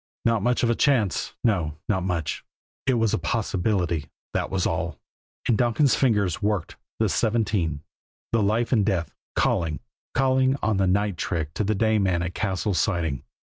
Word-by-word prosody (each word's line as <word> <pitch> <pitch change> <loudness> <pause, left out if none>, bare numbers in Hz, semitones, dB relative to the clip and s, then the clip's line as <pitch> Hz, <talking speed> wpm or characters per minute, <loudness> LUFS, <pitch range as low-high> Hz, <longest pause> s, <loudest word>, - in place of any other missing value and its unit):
Not 115 -2 +3
much 125 +4 +1
of 120 - +3
a - - +3
chance? 120 - +1
No 90 -10 +1
not 95 -3 +1
much! 90 -4 -2 0.4
It 130 - +4
was 115 -2 +2
a - - +1
possibility, 90 -5 -1 0.2
that - - -1
was 95 -2 0
all; - - -2 0.5
and 120 - +4
Donkin's 120 +4 +3
fingers 105 - +2
worked 105 -4 -1 0.2
the - - +2
seventeen, 105 -9 0 0.5
the 115 - +2
life 110 +4 +1
and 110 -6 +4
death 95 -5 -1 0.2
calling, 80 -3 +1 0.4
calling 130 0 +3
on 110 -2 +2
the 95 -1 +2
night 100 0 +1
trick 80 -2 -2
to 105 - -1
the 105 +2 +1
day 110 +1 +2
man 90 -3 +1
at 90 0 -3
Cassil's 95 -2 -1
Siding. 80 -9 0
100 Hz, 170 wpm, -25 LUFS, 90-115 Hz, 0.5 s, It